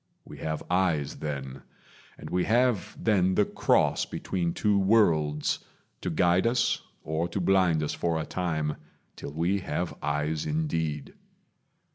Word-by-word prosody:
We - - -11
have 80 -1 -3
eyes 90 -6 +1
then; 70 -3 -5 0.6
And - - -9
we 90 0 +1
have 120 -1 +1
then 95 -4 +2
the 105 - +4
Cross - - +2
between 85 -3 -2
two 105 +2 +2
worlds 80 -8 +2 0.4
To - - -2
guide 90 +4 +3
us, 120 0 +1 0.2
or 80 +2 -1
to 85 +3 -3
blind 90 -4 +3
us 75 - -2
for 85 -2 -1
a 80 - -3
time, 80 -4 -2 0.4
Till - - -7
we 85 +6 0
have 90 -2 -3
eyes 75 +1 -1
indeed. 80 - -2
85 Hz, 140 wpm, -28 LUFS, 75-95 Hz, 0.6 s, the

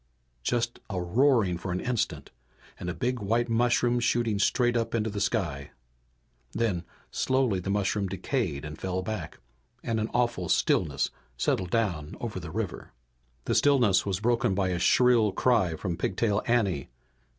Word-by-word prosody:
Just 120 - -1
a 95 -3 -2
roaring 105 -1 +2
for 95 - -4
an 90 - -1
instant 105 - -2 0.5
and 90 - -4
a - - -2
big 125 0 -1
white 115 +4 0
mushroom 120 +1 +2
shooting 120 -3 +1
straight 120 +3 +2
up 115 0 0
into 110 -1 0
the 100 -1 -3
sky. 85 - -1 0.8
Then, 95 -7 -1 0.3
slowly, 130 -7 +1
the 90 - -5
mushroom 100 0 0
decayed 95 - -2
and 75 +1 -8
fell 95 0 -2
back, 100 -6 -5 0.5
and 115 -1 -1
an 110 - -1
awful 120 -7 0
stillness - - +1 0.3
settled 90 +8 0
down 90 -9 -1
over - - -4
the - - -7
river. - - -5 0.5
The - - 0
stillness 125 -10 +4
was 95 -2 -2
broken 115 -4 +2
by 95 -1 +1
a 90 -1 -1
shrill 115 0 +4
cry 95 -7 +2
from 85 0 -3
Pigtail 100 +3 0
Anne. 100 - +1
105 Hz, 155 wpm, -28 LUFS, 90-120 Hz, 0.8 s, stillness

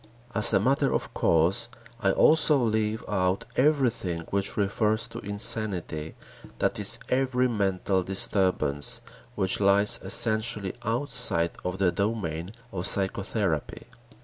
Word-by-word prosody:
As 105 - +5
a - - +3
matter 135 +5 +1
of - - -3
course, 85 +3 +1 0.3
I - - +1
also 155 -1 +4
leave 110 -2 -1
out 95 -1 -1
everything 125 - +1
which 100 0 -2
refers 105 +2 0
to - - -8
insanity, 100 -6 -2 0.4
that - - -1
is, - - +3
every 130 -1 +1
mental 95 -4 -1
disturbance 95 -6 +2 0.3
which 95 -2 0
lies 100 +1 +4
essentially 110 0 0
outside 115 -8 +1
of 90 +1 -4
the 95 -2 +2
domain 85 -4 -3 0.2
of 90 -1 -4
psychotherapy. 95 -4 -2
100 Hz, 120 wpm, -26 LUFS, 95-115 Hz, 0.4 s, As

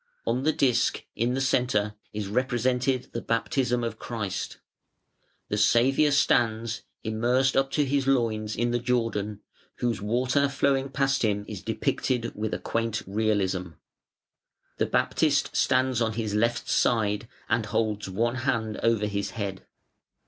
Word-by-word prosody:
On 120 +3 0
the 155 +3 +3
disk, 135 -5 +1
in 120 +3 0
the - - 0
centre, 125 -6 +1 0.2
is 105 -1 -4
represented 125 +2 0
the 115 - -3
Baptism 125 +1 0
of 115 -1 -4
Christ. 105 -5 -4 0.9
The 105 - 0
Saviour 130 +7 +4
stands, 115 -5 +2 0.2
immersed 120 +4 +1
up 135 0 +3
to 150 - +2
His 135 0 0
loins, 110 -5 +1
in 120 +2 0
the 120 - +1
Jordan, 115 -4 -1 0.3
whose 120 -4 -1
water 125 +6 +1
flowing 135 0 +1
past 135 0 +1
Him 105 -2 0
is 105 -4 -6
depicted 115 +3 -1
with 110 +1 -2
a - - -1
quaint 115 -1 -2
realism. 95 -4 0 1.1
The - - +2
Baptist 145 -3 +1
stands 130 -2 +2
on 115 -1 +1
His 110 -2 -2
left 115 +3 +1
side 110 -2 +1 0.2
and 115 -1 0
holds 105 -1 -1
one 115 +6 0
hand 115 -4 -1
over 115 -2 +2
His 100 -1 -2
head. 100 -3 -4
115 Hz, 140 wpm, -27 LUFS, 105-130 Hz, 1.1 s, Saviour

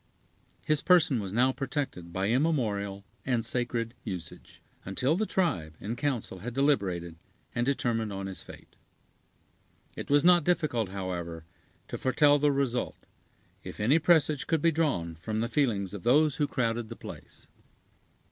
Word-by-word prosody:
His 155 -1 +2
person 160 -8 +4
was 100 -3 -4
now 125 +5 +3
protected 135 - -4
by 95 +2 -1
immemorial 110 -8 0 0.2
and 120 -4 0
sacred 120 -1 -2
usage, 90 -6 -8 0.2
until 125 - 0
the 215 +3 0
tribe 90 - 0
in 110 +3 -4
council 125 -9 -2
had 120 +5 -6
deliberated 95 - 0 0.4
and 120 +1 0
determined 115 -5 0
on 95 0 -4
his 95 -4 -6
fate. - - -14 1.2
It - - -7
was 145 0 +4
not 175 -2 +6
difficult, 145 - +1
however, 90 -4 -5 0.4
to - - -5
foretell 145 +3 +4
the 145 0 +3
result, 135 -3 -1 0.7
if - - -8
any 130 +10 +4
presage 155 -3 +3
could 160 -3 +1
be 165 - +5
drawn 140 - 0
from 100 +7 -5
the 115 - 0
feelings 115 -7 0
of 100 - -6
those 150 - +3
who 145 - +1
crowded 115 -3 -1
the 115 - -7
place. - - -11
120 Hz, 150 wpm, -29 LUFS, 100-145 Hz, 1.2 s, not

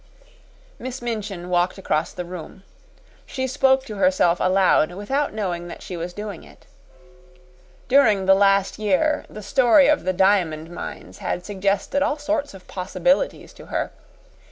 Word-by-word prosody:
Miss 255 +1 -6
Minchin 210 -7 -4
walked 180 +1 +1
across 155 -4 -1
the 180 - -6
room. 180 +1 -9 0.6
She 260 -1 -3
spoke 265 0 +2
to 215 -5 -7
herself 195 -8 +3
aloud 185 -3 +3
without 270 +10 -1
knowing 180 -5 -3
that - - -9
she 185 - -6
was 170 +1 -5
doing 205 -2 -7
it. - - -18 1.2
During 225 -8 +4
the 195 - +6
last 195 +1 +3
year 215 +9 +1
the 215 - -9
story 260 +6 +5
of 300 0 +2
the 185 - +1
diamond 175 -4 +1
mines 175 - -8
had 180 - -3
suggested 200 +7 -1
all 290 +1 +1
sorts 295 -5 -2
of 185 - -14
possibilities - - -1
to - - -14
her. - - -2
200 Hz, 150 wpm, -22 LUFS, 180-260 Hz, 1.2 s, the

